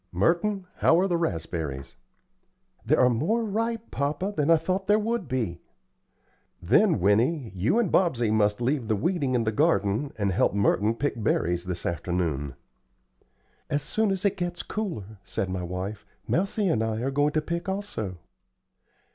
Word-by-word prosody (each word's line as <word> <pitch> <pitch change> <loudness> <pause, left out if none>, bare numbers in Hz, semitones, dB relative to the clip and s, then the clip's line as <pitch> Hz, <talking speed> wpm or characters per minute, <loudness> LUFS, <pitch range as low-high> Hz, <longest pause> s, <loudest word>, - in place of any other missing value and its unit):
Merton, 175 - +1
how 165 - +4
are 190 - +2
the 175 - 0
raspberries?" 80 - -3 0.9
"There 145 +7 +2
are 125 - +6
more 160 - +1
ripe, 225 +2 -2
papa, 150 +8 -1
than 150 +1 +1
I 165 - +7
thought 185 +4 -2
there 210 +1 +5
would 220 -3 -1
be." 110 -10 -2 1.0
"Then, - - +3
Winnie, 115 - +2
you 95 - +1
and 235 -7 +1
Bobsey 125 - +2
must 105 0 +2
leave 130 -1 0
the 110 - +2
weeding 140 - 0
in 120 - +2
the 110 - 0
garden 105 +6 +1
and 100 -2 0
help 95 - +2
Merton 105 +2 +2
pick 135 -2 -2
berries 90 -4 0
this 90 -1 -4
afternoon." 85 -6 -2 1.1
"As 145 -1 0
soon 215 +8 0
as 195 +1 -1
it 200 0 +2
gets 175 -1 -3
cooler," 110 - -5
said 95 -1 -3
my 95 -1 -2
wife, 90 +4 -5 0.2
"Mousie 200 +3 0
and 115 -10 +1
I 110 0 -2
are 135 +2 -1
going 145 +2 +1
to 155 - +2
pick, 170 +3 -3
also." 190 - -4
130 Hz, 165 wpm, -26 LUFS, -, 1.1 s, I